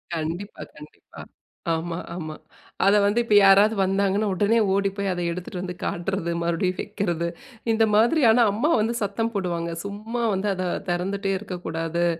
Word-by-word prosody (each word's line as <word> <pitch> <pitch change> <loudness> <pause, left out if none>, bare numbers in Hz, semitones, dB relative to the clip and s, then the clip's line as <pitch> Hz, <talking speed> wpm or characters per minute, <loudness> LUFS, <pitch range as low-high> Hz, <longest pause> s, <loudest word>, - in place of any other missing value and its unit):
கண்டிப்பா 165 +6 -5
கண்டிப்பா. 150 0 -13 0.5
ஆமா 165 +1 -3 0.2
ஆமா 155 -3 -6 0.5
அத 200 +1 +5
வந்து 205 +4 +2
இப்போ 215 -3 +2
யாராவது 200 +3 +6
வந்தாங்கன்னா, 195 +2 +1
உடனே 210 +5 +2
ஓடி 195 0 +2
போய் 200 -1 -1
அத 175 - -4
எடுத்துட்டு 180 +1 -6
வந்து 180 -1 -5
காட்டுறது, 175 0 -2
மறுபடியும் 170 +2 0
வைக்கிறது. 175 -5 -2 0.4
இந்த 225 0 +3
மாதிரியான 235 0 +5
அம்மா 235 +10 0
வந்து 225 +2 0
சத்தம் 225 +3 -1
போடுவாங்க, 170 -3 -2
"சும்மா 215 +4 -4
வந்து 195 +2 -1
அத 185 0 -3 0.2
திறந்துட்டே 195 +3 -1
இருக்கக்கூடாது." 170 -3 -3
195 Hz, 145 wpm, -24 LUFS, 175-210 Hz, 0.5 s, யாராவது